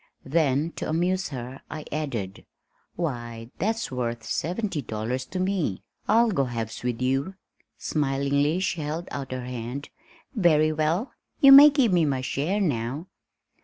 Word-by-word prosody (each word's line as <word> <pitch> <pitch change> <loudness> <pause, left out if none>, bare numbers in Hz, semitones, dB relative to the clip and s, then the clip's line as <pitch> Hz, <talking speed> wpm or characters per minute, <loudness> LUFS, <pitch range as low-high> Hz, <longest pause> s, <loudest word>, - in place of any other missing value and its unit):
Then 150 +1 +1
to - - -3
amuse 180 +4 0
her, 130 -1 -7
I 155 0 -6
added, 120 -11 -4 0.5
"Why, 120 -7 -4
that's 225 +1 -1
worth 120 -2 -3
seventy 180 - -2
five 120 - -19
dollars 115 +4 -3
to 185 - -4
me. 185 - -1 0.2
I'll 230 +2 +4
go 140 -8 +1
halves 115 -3 -5
with 125 0 -2
you." 135 +9 0 0.4
Smilingly 140 +2 0
she 170 -3 -1
held 155 +4 -4
out 135 -2 -5
her 130 -1 -4
hand. 125 +3 -5 0.4
"Very 155 - +3
well, 155 - 0 0.3
you 275 -3 +8
may 285 +2 +11
give 270 -8 +2
me 175 -2 +4
my 135 -3 0
share 150 +10 -1
now." 140 - -2
150 Hz, 150 wpm, -26 LUFS, 125-180 Hz, 0.5 s, may